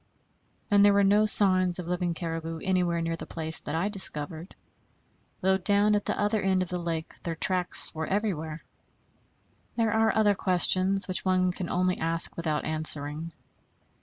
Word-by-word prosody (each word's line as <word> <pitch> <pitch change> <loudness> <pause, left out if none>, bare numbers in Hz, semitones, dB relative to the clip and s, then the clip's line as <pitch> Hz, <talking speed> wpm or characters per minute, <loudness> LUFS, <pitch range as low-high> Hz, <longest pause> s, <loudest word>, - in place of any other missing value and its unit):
And 200 0 +5
there 205 0 +5
were 200 - +3
no 205 +2 +3
signs 185 -4 +5
of 180 -2 -7
living 175 -1 -2
caribou 165 -1 -5
anywhere 180 -3 0
near 165 0 -2
the - - -9
place 160 -1 +1
that - - -6
I 170 +5 -1
discovered; 170 -4 -1 0.9
though 190 +1 +1
down 205 +2 +3
at 205 0 -1
the - - -3
other 210 +1 0
end 190 -1 +1
of 180 - -9
the 180 - -4
lake 165 -2 -5
their 165 -1 -4
tracks 180 +2 0
were 160 -1 -5
everywhere. 165 -6 -3 1.1
There 225 -2 0
are 220 0 +2
other 215 -2 +3
questions, 190 +1 0
which 185 - -1
one 185 -1 +1
can 180 -1 -6
only 185 0 0
ask 165 +1 -1
without 155 -3 -3
answering. 155 0 -4
180 Hz, 165 wpm, -27 LUFS, 165-195 Hz, 1.1 s, And